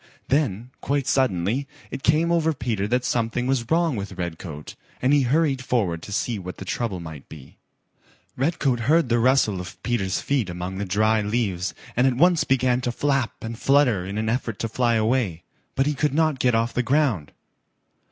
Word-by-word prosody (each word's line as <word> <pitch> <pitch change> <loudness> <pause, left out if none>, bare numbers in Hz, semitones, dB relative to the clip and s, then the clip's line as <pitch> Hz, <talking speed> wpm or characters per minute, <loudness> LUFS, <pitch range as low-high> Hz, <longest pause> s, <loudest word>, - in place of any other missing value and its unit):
Then 125 -5 0
quite 140 -1 0
suddenly 130 0 +1 0.2
it - - -5
came 155 +3 +2
over 160 -2 +2
Peter 110 -5 -2
that 125 +3 0
something 120 +1 0
was 130 -3 0
wrong 165 -3 +2
with 100 -2 -5
Redcoat, 80 -3 -6 0.3
and 130 +3 +2
he 145 - +5
hurried 135 0 +1
forward 100 -10 0
to 105 - -9
see 110 +1 -1
what 90 -1 -7
the 95 - -8
trouble 100 -1 -2
might 80 -4 -9
be. 75 -4 -13 0.8
Redcoat 135 -3 0
heard 150 +4 +2
the 120 0 +3
rustle 115 -6 +3
of 90 +1 -9
Peter's 105 -6 0
feet 130 -9 -1
among 90 +2 -5
the 100 - -2
dry 110 +3 +2
leaves 105 -4 -1 0.2
and 125 +2 +4
at 130 - +1
once 175 +2 +4
began 130 -1 +2
to 120 - -1
flap 135 -1 -1
and 115 0 -6
flutter 135 -9 +3
in 100 +3 -5
an 110 0 -1
effort 115 -2 -1
to 115 - -2
fly 120 +1 +1
away, 110 -6 0 0.3
but 135 - +2
he 150 - +1
could 145 0 0
not 155 -4 +2
get 125 -2 +2
off 115 +1 0
the 125 - +1
ground. 125 - +1
120 Hz, 190 wpm, -24 LUFS, 100-135 Hz, 0.8 s, he